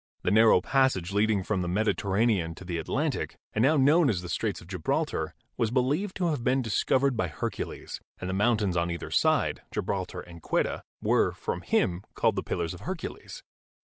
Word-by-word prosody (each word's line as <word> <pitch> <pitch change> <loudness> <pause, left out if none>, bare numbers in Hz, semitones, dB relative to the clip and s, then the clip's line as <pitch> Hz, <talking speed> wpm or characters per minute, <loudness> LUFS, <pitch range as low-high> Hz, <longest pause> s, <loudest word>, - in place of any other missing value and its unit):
The - - +1
narrow 110 -3 +6
passage 130 -8 +1
leading 105 -1 +2
from 95 -1 -1
the 90 - -2
Mediterranean 100 -2 +1
to 95 - -11
the 85 -2 -3
Atlantic, 80 - -2 0.2
and 110 - +1
now 145 +5 +4
known 145 +3 +5
as 90 -6 -1
the 90 - -7
Straits 100 +4 -1
of - - -13
Gibraltar, 90 -4 -2 0.2
was 115 - +1
believed 140 - 0
to 180 -2 0
have 145 -7 -2
been 130 +1 +2
discovered 130 +4 +2
by 100 -5 0
Hercules, 75 - -5 0.2
and 90 - -4
the 95 - -2
mountains 105 -2 +2
on 85 0 +1
either 85 -1 -5
side - - +2
— - - -43
Gibraltar - - -3
and 85 -1 -12
Ceuta - - 0
— - - -56
were, - - +3
from - - -4
him, 90 0 +1
called - - +2
the - - -1
Pillars 85 -1 -2
of 90 - -9
Hercules. 185 -3 -6
105 Hz, 195 wpm, -28 LUFS, 90-130 Hz, 0.2 s, narrow